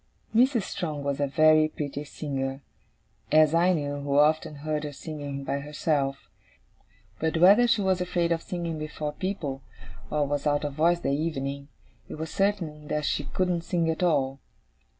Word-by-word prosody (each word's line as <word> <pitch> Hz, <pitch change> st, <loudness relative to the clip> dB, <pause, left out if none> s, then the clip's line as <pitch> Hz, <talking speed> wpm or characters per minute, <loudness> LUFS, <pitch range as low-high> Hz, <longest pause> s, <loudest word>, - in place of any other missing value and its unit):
Mrs. 240 Hz, -1 st, +4 dB
Strong 155 Hz, -7 st, -4 dB
was 140 Hz, 0 st, -2 dB
a 145 Hz, -, +1 dB
very 155 Hz, +2 st, +5 dB
pretty 145 Hz, -2 st, -5 dB
singer: 135 Hz, -2 st, -4 dB, 0.7 s
as 155 Hz, 0 st, +5 dB
I 175 Hz, +2 st, +4 dB
knew, 145 Hz, -3 st, -2 dB
who 140 Hz, 0 st, -1 dB
often 150 Hz, +1 st, +3 dB
heard 150 Hz, +1 st, -3 dB
her 150 Hz, -, -4 dB
singing 145 Hz, -2 st, -6 dB
by 140 Hz, +1 st, -2 dB
herself. 140 Hz, -1 st, -1 dB, 0.9 s
But, 160 Hz, +1 st, 0 dB
whether 200 Hz, +8 st, +7 dB
she 230 Hz, -3 st, +3 dB
was 190 Hz, -1 st, +1 dB
afraid 175 Hz, -1 st, 0 dB
of 165 Hz, -1 st, +1 dB
singing 170 Hz, -3 st, -4 dB
before 150 Hz, -1 st, -4 dB
people, 150 Hz, -7 st, -4 dB, 0.5 s
or 150 Hz, -1 st, +1 dB
was 145 Hz, +1 st, -1 dB
out 145 Hz, 0 st, +1 dB
of 145 Hz, -, -3 dB
voice 170 Hz, +4 st, +2 dB
that -, -, -1 dB
evening, 140 Hz, -2 st, -2 dB, 0.4 s
it -, -, -6 dB
was 160 Hz, +1 st, -5 dB
certain 170 Hz, -7 st, -1 dB
that 150 Hz, 0 st, -1 dB
she 145 Hz, -, -1 dB
couldn't 180 Hz, 0 st, 0 dB
sing 165 Hz, -1 st, 0 dB
at 160 Hz, -, -4 dB
all. 140 Hz, -6 st, +1 dB
155 Hz, 170 wpm, -27 LUFS, 145-170 Hz, 0.9 s, whether